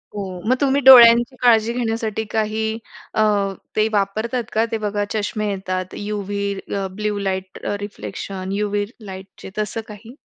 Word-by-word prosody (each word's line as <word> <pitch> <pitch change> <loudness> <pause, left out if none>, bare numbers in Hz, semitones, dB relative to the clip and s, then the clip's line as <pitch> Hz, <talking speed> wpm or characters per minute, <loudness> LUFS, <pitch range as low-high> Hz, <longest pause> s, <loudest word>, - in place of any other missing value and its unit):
हो. 190 -3 -5
मग 255 - +5
तुम्ही 280 0 +2
डोळ्यांची 240 -1 +8
काळजी 230 -2 +4
घेण्यासाठी 225 -2 -2
काही 220 0 -1 0.4
अ, - - +1 0.5
ते 215 0 +3
वापरतात 220 +5 0
का? 220 +1 +2
ते 225 - 0
बघा 210 -1 -2
चष्मे 215 0 -2
येतात, 185 -1 -3
यूव्ही 205 -1 -3 0.2
अ, 195 -1 -1
ब्लू 210 +1 -2
लाईट 190 -1 -3 0.2
रिफ्लेक्शन, 195 -2 -6
यूव्ही 205 0 -1 0.2
लाईटचे 190 0 -10
तसं 215 +2 -2
काही? 220 +4 -12
210 Hz, 140 wpm, -21 LUFS, 200-225 Hz, 0.5 s, डोळ्यांची